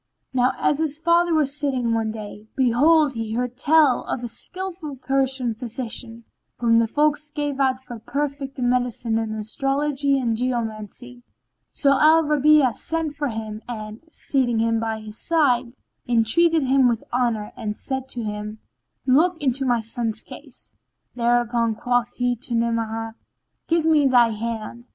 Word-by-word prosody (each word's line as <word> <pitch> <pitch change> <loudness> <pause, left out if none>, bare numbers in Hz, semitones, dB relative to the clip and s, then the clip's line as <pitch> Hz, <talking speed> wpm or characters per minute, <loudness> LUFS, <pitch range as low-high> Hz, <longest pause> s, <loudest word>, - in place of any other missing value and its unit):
Now 255 0 +2
as 290 - +1
his 305 -2 -1
father 340 +1 +2
was 295 -3 +1
sitting 260 -6 -1
one 225 -1 0
day, 215 -1 -8
behold 275 +4 +4
he 225 -2 -4
heard 250 0 -2
tell 290 -1 +4
of 245 - -4
a - - -2
skillful 350 +3 -5
Persian 265 -2 0
physician, 230 0 -3 0.3
whom 230 -1 +3
the 230 - +2
folk 295 +4 +2 0.2
gave 290 -2 -2
out 260 -1 +2
for 240 -3 -9
perfect 280 +3 -4
in 245 -2 0
medicine 245 -2 0
and 220 -1 -3
astrology 275 +5 0
and 235 -4 0
geomancy. 240 0 -4 0.5
So 275 -2 +2
Al 320 +1 +6
Rabi'a 300 -3 +4
sent 325 +2 -2
for 290 0 -2
him 220 -2 -5
and, 215 -2 -6
seating 255 -7 -1
him 225 0 +1
by 220 -1 -3
his 215 0 -8
side, 255 -7 +2 0.4
entreated 280 +8 +3
him 265 0 +4
with 230 -2 0
honour 235 -4 0
and 210 -1 -4
said 265 +1 -5
to 240 - -4
him, 210 0 -5 0.5
"Look 320 +7 +3
into 270 -1 +1
my 240 -2 +2
son's 225 0 -3
case." - - -9 0.4
Thereupon 235 -1 +1
quoth 245 +1 0
he 245 0 0
to 235 0 -4
Ni'amah, 225 -1 -1 0.5
"Give 330 -1 +1
me 305 -3 +4
thy 245 -3 +5
hand." 230 +1 -5
245 Hz, 155 wpm, -23 LUFS, 230-280 Hz, 0.5 s, Al